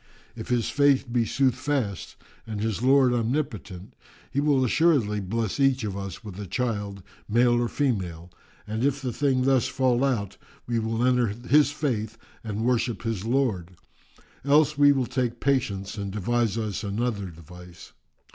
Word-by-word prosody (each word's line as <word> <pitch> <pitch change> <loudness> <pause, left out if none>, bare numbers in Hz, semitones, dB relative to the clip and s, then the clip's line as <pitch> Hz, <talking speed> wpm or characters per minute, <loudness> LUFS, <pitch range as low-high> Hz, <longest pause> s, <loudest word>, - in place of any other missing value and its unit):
If - - -7
his 120 -2 0
Faith 140 -4 +2
be 120 -2 +2
soothfast 130 - -1 0.3
and 110 -2 -4
his 110 0 -2
Lord 130 -1 +4
Omnipotent, 115 -6 -3 0.4
He 140 - 0
will 140 -3 +3
assuredly 125 -7 +2
bless 110 +4 -2
each 135 -2 +3
of 100 -3 -3
us 100 0 -6
with 100 -3 -9
a 100 - -6
child 100 -3 -3 0.3
male 120 +2 +3
or 120 - +1
female, 90 - -2 0.3
and 110 +3 -3
if 140 0 +1
the 130 -3 -4
thing 135 -1 +1
thus 135 -2 +3
fall 130 -1 +1
out, 120 -8 -1 0.3
we 120 -1 -1
will 115 +2 -1
enter 125 -2 +3
his 125 +8 +2
faith 115 -7 -2 0.3
and 110 0 -3
worship 120 -2 0
his 110 -4 -3
Lord; 110 -9 -1 0.7
else 150 +2 +4
will 145 0 +6
we 130 -2 +1
take 125 -2 -2
patience 110 -8 -1
and 100 -1 -4
devise 115 +2 0
us 110 -2 -3
another 105 0 -2
device." 90 +1 -13
115 Hz, 155 wpm, -26 LUFS, 105-130 Hz, 0.7 s, will